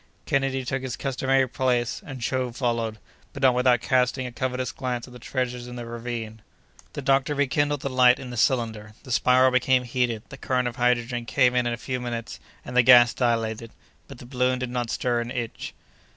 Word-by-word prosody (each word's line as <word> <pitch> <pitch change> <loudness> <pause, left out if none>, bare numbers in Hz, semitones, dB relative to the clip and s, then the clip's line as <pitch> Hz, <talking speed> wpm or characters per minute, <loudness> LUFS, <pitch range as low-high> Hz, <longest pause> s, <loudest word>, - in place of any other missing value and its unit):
Kennedy 135 -1 0
took 130 +1 -2
his 130 -2 -5
customary 135 0 +1
place, 125 -1 -1
and 135 -1 -8
Joe 125 +1 -1
followed, 115 -3 -2 0.4
but 140 - -7
not 130 -2 +6
without 125 -1 +3
casting 130 +1 +1
a 125 - -5
covetous 130 0 -3
glance 125 -2 -4
at 125 - -15
the 125 - -11
treasures 125 -1 -3
in 125 - -8
the 120 -1 -6
ravine. 115 -2 -6 0.5
The 145 - -6
doctor 135 +2 +2
rekindled 145 +1 0
the 140 - -3
light 125 -1 +5
in 125 -2 -8
the - - -6
cylinder; 110 -3 0
the 130 - -9
spiral 130 +1 +4
became 130 0 +2
heated; 120 -3 -1
the 135 - -10
current 125 -2 -1
of 120 - -6
hydrogen 120 -1 0
came 125 -1 +3
in 125 -1 +1
a 120 0 -2
few 125 +2 -4
minutes, 120 -2 -5 0.3
and 125 - -7
the 125 - +7
gas 120 0 +7
dilated; 115 -2 -1 0.3
but - - -11
the 120 - -12
balloon 125 0 0
did 125 -1 -4
not 120 -2 -2
stir 120 0 0
an 120 - -5
inch. 120 -2 -5
125 Hz, 200 wpm, -25 LUFS, 120-130 Hz, 0.5 s, the